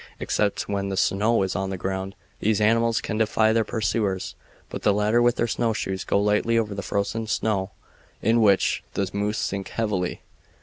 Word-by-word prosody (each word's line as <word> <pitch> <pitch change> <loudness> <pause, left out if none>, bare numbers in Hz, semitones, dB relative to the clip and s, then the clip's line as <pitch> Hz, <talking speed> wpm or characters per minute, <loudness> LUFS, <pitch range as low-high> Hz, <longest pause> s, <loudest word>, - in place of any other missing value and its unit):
Except 105 -1 -1
when 100 -1 -2
the 95 - -3
snow 105 +3 +2
is 95 - -2
on 95 0 -1
the 95 - -3
ground 95 +1 -4 0.2
these 110 0 +1
animals 115 +2 +3
can 110 -1 -3
defy 110 0 +3
their 115 0 +3
pursuers, 105 -4 -1 0.4
but - - -5
the 105 - +3
latter 105 +3 +2
with 120 0 +3
their - - +1
snowshoes 110 -5 -1
go - - +1
lightly 105 +3 +2
over 110 -3 0
the 100 - -4
frozen 100 +4 -2
snow, 100 -3 0 0.5
in 115 +2 +2
which 100 -3 +3
the 100 - 0
moose 105 +1 -1
sink 100 0 -2
heavily. 100 -6 -2
105 Hz, 180 wpm, -24 LUFS, 95-110 Hz, 0.5 s, animals